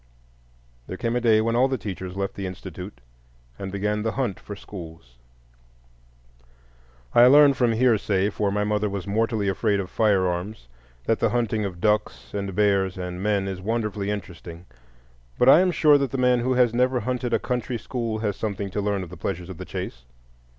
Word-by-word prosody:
There 95 - -6
came 115 +2 -1
a 125 - 0
day 110 -2 +4
when 115 +1 0
all 125 +2 +4
the 130 -1 -1
teachers 95 -4 -6
left 100 0 -2
the 100 -1 -5
Institute 90 -3 -9 0.6
and 95 -1 -5
began 105 +2 -1
the 110 +1 -1
hunt 125 -8 -2
for 105 - -8
schools. 80 -11 -11 1.9
I 120 +1 +7
learn 145 +1 +7
from 120 -3 +1
hearsay 105 -4 +2
(for 100 0 -1
my 105 +1 0
mother 105 0 0
was 100 -2 -4
mortally 110 0 0
afraid 100 +1 +1
of 95 -2 -5
firearms) 95 - 0 0.4
that 115 - +1
the - - +2
hunting 115 -3 0
of 90 -3 -6
ducks 85 - -1
and 100 -2 -4
bears 100 -2 +2
and 90 0 -5
men 100 -1 0
is 95 -1 -5
wonderfully 105 -1 -2
interesting, 90 -4 -7 0.7
but 125 - +3
I 135 - +9
am 185 0 +3
sure 150 -4 +5
that 140 -1 0
the 135 - -4
man 125 -1 +3
who 130 +2 0
has 125 -2 +3
never 125 +1 +2
hunted 125 +1 -2
a - - +3
country 125 -1 -3
school 115 -2 -3
has 105 -3 -1
something 100 -2 -4
to 105 - -2
learn 100 -1 -1
of 85 - -10
the 90 - -9
pleasures 90 +1 -4
of 95 - -8
the - - -6
chase. - - -6
105 Hz, 190 wpm, -24 LUFS, 95-120 Hz, 1.9 s, I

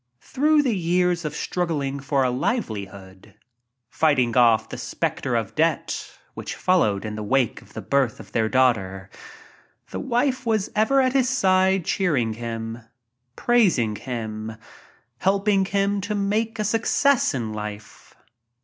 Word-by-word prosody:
Through 300 - +2
the 245 -6 +1
years 175 -1 +1
of 150 -1 -4
struggling 150 -7 -2
for 140 -1 0
a 125 - +1
livelihood, 100 - -4 0.5
fighting 130 -4 +1
off 115 -3 +4
the - - -7
spectre - - -2
of - - -2
debt - - -1 0.2
which - - -6
followed 110 - +1
in 105 - -4
the 105 - -5
wake 125 +2 0
of - - -19
the - - -7
birth 135 -5 +1
of - - -12
their 110 -1 +1
baby, 100 -7 +1 0.8
the - - -4
wife 260 +1 0
was 220 -4 0
ever 245 +6 +3
at 255 -1 +1
his 260 -2 +2
side 190 -6 +2
cheering 140 - 0
him, 115 0 -5 0.6
praising 180 - +2
him, 110 -1 -5 0.7
helping 195 0 +2
him 200 +1 0
to 205 +2 -3
make 215 +3 -1
a 215 - -1
success 230 - +2
in 115 -4 -3
life. 105 -1 -8
150 Hz, 140 wpm, -23 LUFS, -, 0.8 s, off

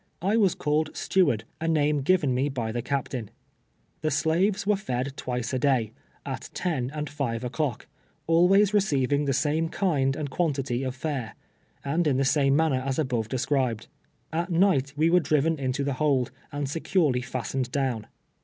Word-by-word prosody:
I 200 +4 +2
was 200 -6 +3
called 150 +1 -1
steward 145 - +2
— - - -41
a 165 - -1
name 150 -2 +2
given 150 -3 +2
me 130 +3 +1
by 120 -5 -3
the 120 +1 -2
cap 140 +1 -2
tain. 115 -6 -5 0.7
The 155 - +1
slaves 170 +7 +1
were 210 0 +3
fed 135 -9 -3
twice 125 -2 -3
a 130 - +1
day, 125 -6 +2 0.3
at - - -5
ten 135 -9 -1
and 150 +1 -4
five 125 -5 -3
o'clock 125 +1 -2 0.2
— - - -40
always 185 +5 +4
receiving 145 -8 +2
the 140 - +1
same 160 +4 +1
kind 140 -9 +1
and 145 -3 -4
quantity 135 -7 -1
of 130 -1 -3
fare, 130 -5 -4 0.5
and 160 +4 +1
in 135 -3 +2
the 135 - +2
same 140 -1 +3
manner 150 -4 +2
as 135 -1 -2
above 125 -7 -1
described. 130 -3 -1 0.4
At 170 +3 -1
night 165 -7 +2
we 160 +3 +2
were 180 - +6
driven 155 0 +1
into 130 +1 -1
the 140 0 -1
hold, 130 -3 +1 0.2
and 145 -1 -3
securely 150 -3 +1
fastened 130 0 -3
down. 130 -6 -1
140 Hz, 180 wpm, -26 LUFS, 130-160 Hz, 0.7 s, were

